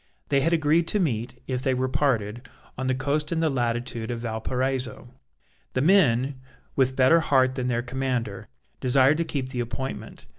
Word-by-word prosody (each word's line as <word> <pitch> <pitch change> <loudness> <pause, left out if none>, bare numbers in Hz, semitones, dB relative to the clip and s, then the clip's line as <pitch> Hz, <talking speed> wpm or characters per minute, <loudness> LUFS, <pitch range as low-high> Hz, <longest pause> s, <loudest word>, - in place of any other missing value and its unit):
They 140 -1 +3
had 165 - +2
agreed 165 0 +3
to 210 - +1
meet, 120 - -2
if 125 -1 -2
they 130 -1 +1
were 130 +1 0
parted, 125 -3 -1 0.3
on 130 +1 -3
the 130 - +1
coast 145 +4 -1
in 165 - 0
the 160 -2 +2
latitude 120 -2 -2
of 120 -1 -3
Valparaiso. 125 +2 -3 0.6
The 130 - 0
men, 135 -6 +3 0.3
with 130 -1 +2
better 130 +6 +5
heart 130 -5 +3
than 130 -1 -2
their 120 -1 0
commander, 125 -5 -3 0.3
desired 130 +3 +4
to - - +2
keep 135 -5 -3
the 130 -2 -4
appointment. 120 +3 -5
130 Hz, 175 wpm, -25 LUFS, 120-140 Hz, 0.6 s, better